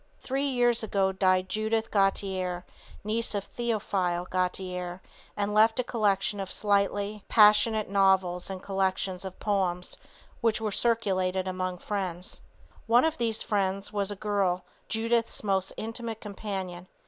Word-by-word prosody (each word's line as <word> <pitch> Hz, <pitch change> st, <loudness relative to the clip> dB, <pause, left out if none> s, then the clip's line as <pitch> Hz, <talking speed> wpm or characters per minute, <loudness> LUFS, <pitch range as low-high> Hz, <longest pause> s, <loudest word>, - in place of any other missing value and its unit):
Three 275 Hz, +2 st, -1 dB
years 245 Hz, -3 st, +2 dB
ago 195 Hz, -3 st, +1 dB
died 185 Hz, -1 st, +2 dB
Judith 220 Hz, +2 st, -1 dB
Gautier, 190 Hz, -3 st, 0 dB, 0.4 s
niece 220 Hz, +1 st, 0 dB
of 200 Hz, -, -1 dB
Theophile 195 Hz, -7 st, -1 dB
Gautier, 180 Hz, -1 st, -2 dB, 0.4 s
and 205 Hz, 0 st, -1 dB
left 225 Hz, +3 st, +4 dB
a -, -, +2 dB
collection 205 Hz, -3 st, +1 dB
of 195 Hz, -1 st, -4 dB
slightly 205 Hz, 0 st, +1 dB
er -, -, -17 dB
passionate 215 Hz, 0 st, +5 dB
novels 190 Hz, -2 st, +2 dB
and 190 Hz, -1 st, -6 dB
collections 190 Hz, -1 st, -1 dB
of 190 Hz, -1 st, -8 dB
poems 185 Hz, -4 st, -1 dB, 0.4 s
which 225 Hz, -2 st, +1 dB
were 220 Hz, -1 st, -2 dB
circulated 190 Hz, -5 st, +1 dB
among 185 Hz, -1 st, -2 dB
friends. 185 Hz, -2 st, -4 dB, 0.5 s
One 240 Hz, +4 st, +5 dB
of 320 Hz, -3 st, -1 dB
these 225 Hz, -2 st, +1 dB
friends 195 Hz, -1 st, -1 dB
was 200 Hz, -1 st, 0 dB
a 205 Hz, -, -3 dB
girl, 195 Hz, -3 st, 0 dB, 0.2 s
Judith's 230 Hz, +1 st, 0 dB
most 190 Hz, -2 st, 0 dB
intimate 225 Hz, 0 st, -5 dB
companion. 190 Hz, -4 st, -5 dB
200 Hz, 135 wpm, -28 LUFS, 185-220 Hz, 0.5 s, passionate